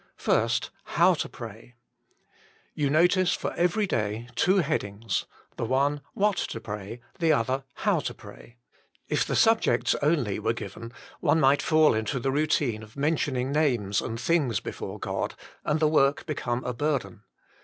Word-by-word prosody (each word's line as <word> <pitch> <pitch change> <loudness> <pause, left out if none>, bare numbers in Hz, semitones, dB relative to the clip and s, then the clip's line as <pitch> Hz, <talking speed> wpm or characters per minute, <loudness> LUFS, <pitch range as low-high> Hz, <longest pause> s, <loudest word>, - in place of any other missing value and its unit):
1. 115 +2 +3 0.5
How 180 +2 +6
to 160 - -3
Pray. 115 +1 -10 1.0
You 145 -2 0
notice 175 +4 +3
for - - -4
every 180 +5 +1
day 115 - -2
two 185 +11 +3
headings 115 - -1 0.3
the - - -2
one 140 +4 +1
What 205 -2 +2
to 115 - -3
Pray; 105 +2 -7 0.2
the 165 -2 +3
other, 130 0 0
How - - +1
to - - -4
Pray. 120 - -14 0.5
If - - +2
the - - -1
subjects 225 - +3
were - - -4
only 135 -11 +1 0.2
given, 115 +2 -7 0.3
one 160 - +3
might 140 -1 +4
fall 155 -1 +4
into 110 +4 -1
the 135 +2 -1
routine 145 -6 +1
of 110 +2 -14
mentioning 140 -3 0
names 120 -10 +1
and 115 0 -4
things 135 - +1
before - - -6
GoJ, - - -3 0.3
and 150 +1 +1
the 155 - +4
work 145 -2 +2
become 125 -5 -2
a 125 - -3
burden. 130 -7 -2
135 Hz, 155 wpm, -27 LUFS, 115-155 Hz, 1.0 s, How